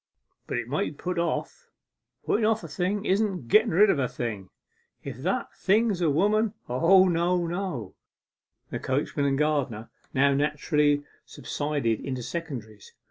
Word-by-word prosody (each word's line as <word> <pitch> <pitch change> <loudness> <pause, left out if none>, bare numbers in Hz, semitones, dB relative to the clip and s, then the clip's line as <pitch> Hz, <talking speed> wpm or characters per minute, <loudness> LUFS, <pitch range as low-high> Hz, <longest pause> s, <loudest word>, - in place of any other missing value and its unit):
But - - -2
it 120 -1 -3
might 145 +5 0
be - - -16
put 180 -1 -1
off; 465 - -3 0.6
putten 220 - +1
off 220 0 +2
a - - -6
thing 200 +3 -2
isn't 190 - 0
getten 220 - +5
rid 195 +4 +5
of 140 - 0
a 130 - +1
thing, 110 -6 -5 0.5
if 135 -4 -6
that 175 +9 -2
thing 220 +4 +2
is 180 -3 -3
a 165 - +3
woman. 210 +8 +2
O 175 +10 +5
no, 175 0 +1
no!' 170 - -4 0.8
The - - -3
coachman 140 +1 -1
and 135 -1 +1
gardener 140 -7 -1 0.2
now 140 +1 +3
naturally 150 0 +1 0.2
subsided 145 -7 -2
into 130 -3 -4
secondaries. 120 -11 -7
155 Hz, 155 wpm, -26 LUFS, 135-190 Hz, 0.8 s, getten